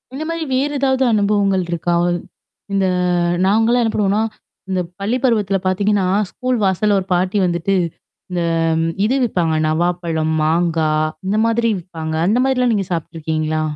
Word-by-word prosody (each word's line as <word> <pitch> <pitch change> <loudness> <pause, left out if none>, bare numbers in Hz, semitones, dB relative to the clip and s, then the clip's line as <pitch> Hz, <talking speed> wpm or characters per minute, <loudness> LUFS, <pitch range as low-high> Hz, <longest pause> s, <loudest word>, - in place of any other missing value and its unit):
இந்த 305 - -4
மாரி 330 0 -2
வேற 275 +3 +1
ஏதாவது 265 -1 +2
அனுபவங்கள் 200 -2 +2
இருக்கா? 175 +1 -1 0.8
இந்த 195 -1 +2 0.6
நாங்கலாம் 225 +5 +3
என்னா 225 - 0
பண்ணுவோம்னா? 205 +1 +1 0.5
இந்த 185 - 0 0.2
பள்ளி 215 +6 0
பருவத்துல 210 -6 +2
பாத்திங்கன்னா, 200 0 +1 0.2
ஸ்கூல் 255 0 -1
வாசல்ல 200 +2 +2
ஒரு 185 - -5
பாட்டி 185 +3 0
வந்துட்டு 175 +2 0 0.6
இந்த 180 -1 -1 0.6
இது 245 +5 +1
விப்பாங்க 175 -7 0
நவாப்பழம், 165 -1 0
மாங்காய். 155 -1 +1 0.2
இந்த 205 - +1
மாதிரி 230 0 +1
விப்பாங்க 160 -2 -6
அந்த 210 +6 +2
மாதிரிலாம் 250 -2 +2
நீங்க 200 -3 0
சாப்ட்டுருக்கீங்களா? 155 -2 -2
195 Hz, 135 wpm, -18 LUFS, 170-225 Hz, 0.8 s, நாங்கலாம்